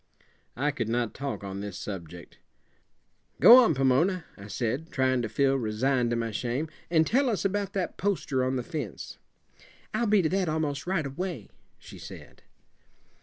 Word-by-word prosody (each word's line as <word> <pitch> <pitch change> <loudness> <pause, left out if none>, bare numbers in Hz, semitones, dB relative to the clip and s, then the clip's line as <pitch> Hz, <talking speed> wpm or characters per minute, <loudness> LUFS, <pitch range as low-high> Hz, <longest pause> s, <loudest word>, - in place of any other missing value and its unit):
I 145 +4 +1
could 115 -6 -3
not 120 -1 -1
talk 140 -5 -5
on 100 0 -5
this 100 -2 -6
subject. 90 -4 -8 1.0
"Go 240 - +10
on, 165 - +2
Pomona," 150 +7 +2
I 100 0 -11
said, 125 +9 -3
trying 130 -2 +1
to 110 - -3
feel 135 +2 +2
resigned 120 +2 0
to 120 - 0
my 115 -1 -2
shame, 125 +8 -2 0.2
"and 160 -2 +4
tell 260 - +2
us 210 -3 -1
about 200 0 -1
that 190 -3 -3
poster 175 -10 0
on 130 +1 0
the 125 - -2
fence." 150 - -6 0.7
"I'll 235 - 0
be 205 -3 +4
to 155 - +1
that 185 -1 0
almost 155 -1 -2
right 180 -5 0
away," 175 +6 -5 0.3
she - - -13
said. - - -11
135 Hz, 170 wpm, -28 LUFS, 120-175 Hz, 1.0 s, Go